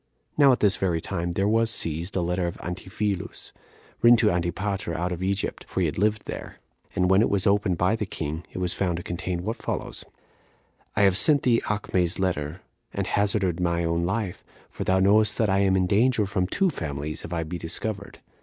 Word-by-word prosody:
Now 140 Hz, -2 st, +6 dB
at 125 Hz, -, +1 dB
this 100 Hz, -2 st, +4 dB
very 90 Hz, -4 st, 0 dB
time 85 Hz, +1 st, -3 dB
there 95 Hz, +3 st, +1 dB
was 115 Hz, +1 st, +2 dB
seized 85 Hz, -3 st, -1 dB
a 95 Hz, -, +1 dB
letter 90 Hz, +1 st, -1 dB
of 85 Hz, -, -5 dB
Antiphilus, 95 Hz, +2 st, -4 dB, 0.5 s
written 120 Hz, 0 st, +7 dB
to 110 Hz, -2 st, +3 dB
Antipater 90 Hz, +1 st, -2 dB
out 90 Hz, +2 st, -1 dB
of 90 Hz, 0 st, -4 dB
Egypt 100 Hz, +1 st, -2 dB
[for -, -, -2 dB
he -, -, +2 dB
lived 105 Hz, +2 st, 0 dB
there]; -, -, -7 dB, 0.4 s
and 90 Hz, -2 st, +2 dB
when 95 Hz, +2 st, +5 dB
it -, -, +2 dB
was 100 Hz, -2 st, +2 dB
opened 100 Hz, -3 st, +2 dB
by 90 Hz, +6 st, +2 dB
the 105 Hz, -3 st, -3 dB
king, 80 Hz, -1 st, -4 dB
it -, -, -9 dB
was 90 Hz, -1 st, 0 dB
found 90 Hz, -3 st, -1 dB
to 85 Hz, -, -6 dB
contain 90 Hz, 0 st, -3 dB
what 110 Hz, +4 st, -3 dB
follows: -, -, -4 dB, 0.9 s
"I 105 Hz, -, +2 dB
have 95 Hz, -2 st, +5 dB
sent 145 Hz, +4 st, +4 dB
thee 120 Hz, -2 st, +3 dB
Acme's 95 Hz, -4 st, 0 dB
letter, 85 Hz, -2 st, -2 dB, 0.3 s
and -, -, -2 dB
hazarded 100 Hz, -4 st, +1 dB
my 85 Hz, -1 st, 0 dB
own 85 Hz, 0 st, 0 dB
life; 95 Hz, +1 st, -2 dB, 0.3 s
for -, -, -5 dB
thou 95 Hz, 0 st, +2 dB
knowest 105 Hz, +3 st, +4 dB
that 110 Hz, -4 st, +2 dB
I 95 Hz, -, +3 dB
am 95 Hz, -1 st, +3 dB
in 95 Hz, -1 st, +2 dB
danger 110 Hz, +3 st, +3 dB
from 95 Hz, -2 st, -1 dB
two 190 Hz, -, +1 dB
families, 75 Hz, -, -4 dB
if -, -, -8 dB
I 85 Hz, -1 st, -1 dB
be 85 Hz, +2 st, -5 dB
discovered. 100 Hz, +5 st, -4 dB
95 Hz, 205 wpm, -25 LUFS, 85-105 Hz, 0.9 s, written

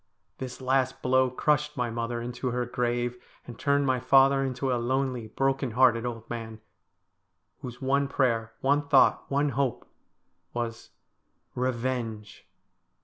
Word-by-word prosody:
This 130 Hz, 0 st, -6 dB
last 130 Hz, 0 st, 0 dB
blow 130 Hz, 0 st, +3 dB
crushed 150 Hz, +3 st, 0 dB
my 120 Hz, -2 st, -1 dB
mother 115 Hz, +1 st, -3 dB
into 125 Hz, +2 st, -4 dB
her 125 Hz, 0 st, -1 dB
grave, 120 Hz, 0 st, -2 dB, 0.2 s
and 120 Hz, -2 st, -10 dB
turned 140 Hz, -1 st, +2 dB
my 130 Hz, -1 st, +1 dB
father 135 Hz, +2 st, +5 dB
into 130 Hz, 0 st, -2 dB
a 120 Hz, -, -1 dB
lonely, 130 Hz, -2 st, -1 dB
broken 135 Hz, +3 st, 0 dB
hearted 120 Hz, -2 st, +4 dB
old 115 Hz, -2 st, -6 dB
man, 115 Hz, -2 st, -6 dB, 1.0 s
whose 125 Hz, -1 st, -8 dB
one 140 Hz, +1 st, +2 dB
prayer, 115 Hz, -5 st, 0 dB
one 140 Hz, +2 st, +3 dB
thought, 140 Hz, -2 st, +4 dB
one 145 Hz, +1 st, +1 dB
hope 135 Hz, -3 st, -2 dB, 0.7 s
was 115 Hz, -2 st, -4 dB, 0.4 s
— -, -, -46 dB
Eevenge 120 Hz, -4 st, -3 dB
125 Hz, 140 wpm, -27 LUFS, 120-135 Hz, 1.0 s, father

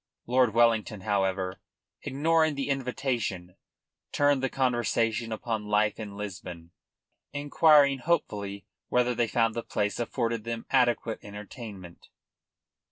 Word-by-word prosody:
Lord 125 Hz, -2 st, +2 dB
Wellington, 115 Hz, -3 st, +3 dB
however, 95 Hz, -2 st, -1 dB, 0.4 s
ignoring 155 Hz, +2 st, +2 dB
the 140 Hz, 0 st, -3 dB
invitation, 125 Hz, -9 st, -2 dB, 0.6 s
turned 145 Hz, -2 st, +3 dB
the 135 Hz, -, 0 dB
conversation 120 Hz, -3 st, 0 dB
upon 110 Hz, -1 st, -3 dB
life 105 Hz, +1 st, +1 dB
in 105 Hz, -2 st, -7 dB
Lisbon, 90 Hz, -4 st, -7 dB, 0.6 s
inquiring 145 Hz, -1 st, +4 dB
hopefully 100 Hz, -, -2 dB, 0.2 s
whether 125 Hz, 0 st, +2 dB
they 120 Hz, -1 st, +1 dB
found 115 Hz, 0 st, +1 dB
the 115 Hz, -, -3 dB
place 105 Hz, -1 st, -2 dB
afforded 115 Hz, -1 st, -1 dB
them 115 Hz, 0 st, -4 dB
adequate 120 Hz, -3 st, +2 dB
entertainment. 105 Hz, -3 st, -10 dB
115 Hz, 110 wpm, -28 LUFS, 105-130 Hz, 0.6 s, inquiring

